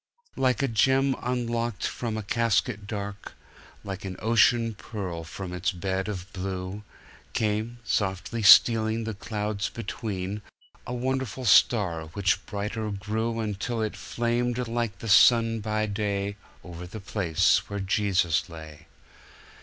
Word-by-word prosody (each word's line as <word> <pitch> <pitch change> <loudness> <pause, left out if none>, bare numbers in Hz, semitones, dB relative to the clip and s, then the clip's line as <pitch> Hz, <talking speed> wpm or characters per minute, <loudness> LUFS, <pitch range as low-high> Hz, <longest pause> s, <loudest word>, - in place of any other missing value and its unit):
"Like 130 +1 +1
a - - +3
gem 135 +3 +3
unlocked 120 -2 -2
from 115 -3 -3
a 110 - -4
casket 105 -2 0
dark, 100 -1 -6 0.5
like 95 -2 -6
an 95 -1 -5
ocean 115 +2 +3
pearl 95 -6 -6
from 90 +2 -7
its 90 0 0
bed 95 +2 -2
of 95 -3 -6
blue, 95 +1 -4 0.5
Came, 110 +2 -1
softly 100 +1 -1
stealing 110 +2 +6
the 110 0 -3
clouds 105 0 -3
between, 105 -3 -4 0.5
a 125 - -3
wonderful 130 -1 -2
star 95 -7 +4
which 100 -1 +1
brighter 105 +1 -3
grew 110 +3 -2
Until 110 +2 -2
it 110 - -3
flamed 120 +1 -1
like 115 -3 -2
the 115 - -7
sun 115 +2 +6
by 110 0 -1
day 100 -1 -2 0.3
Over 90 0 -8
the 110 +5 -8
place 95 -5 +1
where 100 - -3
Jesus 95 -4 +1
lay. 80 -2 -11
105 Hz, 130 wpm, -27 LUFS, 95-115 Hz, 0.5 s, stealing